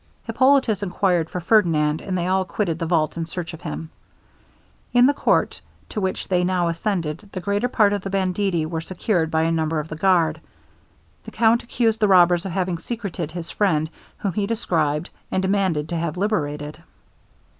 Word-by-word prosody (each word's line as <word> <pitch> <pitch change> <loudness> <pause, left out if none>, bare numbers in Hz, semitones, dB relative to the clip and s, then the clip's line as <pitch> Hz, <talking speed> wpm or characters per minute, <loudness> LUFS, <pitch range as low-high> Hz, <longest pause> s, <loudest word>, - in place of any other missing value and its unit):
Hippolitus 260 -2 +3
inquired 180 -3 0
for 180 - -4
Ferdinand, 165 -6 +2
and 185 -1 -3
they 175 - -1
all 190 +1 +2
quitted 175 -2 -2
the 165 - -2
vault 160 -2 +1
in 165 -1 -3
search 170 -1 -6
of 165 - -10
him. 160 - -6 1.0
In 245 0 +6
the 285 - +4
court, - - +1 0.3
to 210 - -3
which 190 -1 -2
they 180 -1 +1
now 180 -1 +1
ascended, 170 0 -3
the 185 - -4
greater 200 +6 0
part 215 -5 +3
of 205 - -1
the 195 - -5
banditti 190 -3 0
were 160 0 -3
secured 175 -1 -1
by 160 -1 +1
a 165 - +1
number 160 -1 0
of 150 +1 -6
the 155 - -5
guard. 160 -2 +2 0.8
The - - -7
count 230 +1 +3
accused 230 -2 0
the 210 - +3
robbers 180 -1 +5
of - - -5
having 180 -1 -1
secreted 185 -6 -5
his 170 -1 -6
friend, 160 -6 +1 0.3
whom 195 -3 -2
he 200 +2 -1
described, 165 -8 -1 0.2
and 190 - -1
demanded 190 -6 +1
to 170 - -2
have 170 0 -3
liberated. 150 -6 -2
180 Hz, 185 wpm, -22 LUFS, 165-200 Hz, 1.0 s, In